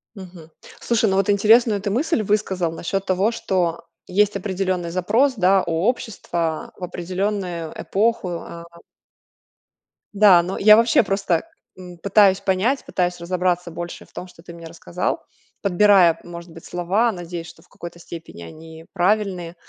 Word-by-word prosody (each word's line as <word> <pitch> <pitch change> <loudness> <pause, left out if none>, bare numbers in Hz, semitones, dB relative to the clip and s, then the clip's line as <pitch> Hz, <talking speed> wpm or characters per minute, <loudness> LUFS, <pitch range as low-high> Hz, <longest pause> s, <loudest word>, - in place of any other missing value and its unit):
Мгм. 175 -4 -12 0.3
Слушай, 230 -3 +1
ну, 190 - 0
вот 195 +1 +1
интересную 215 +1 +4
ты 205 - -2
мысль 275 - 0
высказал 190 -5 -1
насчёт 190 +4 -3
того, 190 +4 +1
что 180 -6 -2 0.2
есть 205 +2 +1
определённый 185 -3 -2
запрос, 220 +10 +1
да, 190 0 +3
у 170 - -4 0.2
общества 175 -9 -3
в 185 - -10
определённую 180 -1 -3
эпоху. 215 -1 0
А 170 0 -10 1.5
Да, 195 -4 +6
но 185 +2 -4
я 215 +2 +7
вообще 230 +1 +4
просто, 195 -4 0 0.3
м, 180 -1 -11
пытаюсь 200 +1 +4
понять, 205 +9 0
пытаюсь 180 -1 -2
разобраться 180 0 -1
больше 170 +1 -7
в - - -28
том, 185 - -7
что 165 -2 -18
ты 170 - -11
мне 170 -1 -10
рассказал, 160 - -4 0.4
подбирая, 190 -3 +4
может 170 0 -10
быть, 165 - -13
слова, 190 +7 0
надеясь, 175 -1 -7
что - - -15
в - - -28
какой-то 170 0 -10
степени 165 - -10
они 160 - -12
правильные. 185 -2 -1
185 Hz, 150 wpm, -21 LUFS, 170-205 Hz, 1.5 s, я